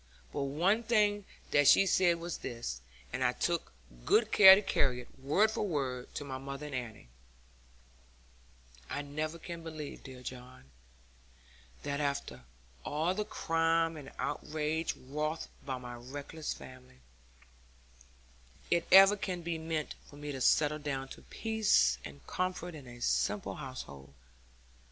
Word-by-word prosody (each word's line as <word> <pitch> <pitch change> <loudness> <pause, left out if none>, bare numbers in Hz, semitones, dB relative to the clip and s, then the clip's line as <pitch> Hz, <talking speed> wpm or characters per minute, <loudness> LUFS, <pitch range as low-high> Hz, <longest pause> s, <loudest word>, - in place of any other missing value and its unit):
But 140 - -1
one 175 +11 +2
thing 210 -3 +2 0.3
that 145 -1 +5
she 195 - +7
said 180 -2 +3
was 170 0 -5
this, 115 - -5 0.3
and - - -1
I - - +3
took - - -1 0.3
good 220 0 +3
care 190 -2 +11
to 200 - +1
carry 130 -9 +1
it, 125 - -18
word 185 +11 +3
for - - -3
word, 135 -10 -2
to - - -3
my 130 -1 -5
mother 140 +2 -6
and 145 - -7
Annie: 110 - -6 1.8
'I 145 - -3
never 155 +3 -4
can 170 0 -7
believe, 155 -3 -7
dear 130 -2 -11
John, 125 - -9 1.1
that 140 0 -2
after 140 - -3 0.4
all 160 +5 0
the 210 +2 -1
crime 165 -1 +1
and 145 -3 -9
outrage 155 +1 -2
wrought 150 +4 -3 0.2
by 130 -2 -3
my 125 -1 -8
reckless 140 +6 -6
family, 130 - -11 1.7
it 170 -1 +2
ever 195 +2 +9
can 185 -3 -4
be 165 -1 -2
meant 160 -1 -3
for - - -14
me 145 0 -6
to 135 -2 -5
settle 150 +3 +3
down 135 -2 -3
to - - -10
peace 215 - +2
and 70 -2 -10
comfort 180 - -3
in 145 -5 -10
a 120 0 -11
simple 100 -4 0
household. 70 - -8
150 Hz, 145 wpm, -32 LUFS, 130-170 Hz, 1.8 s, care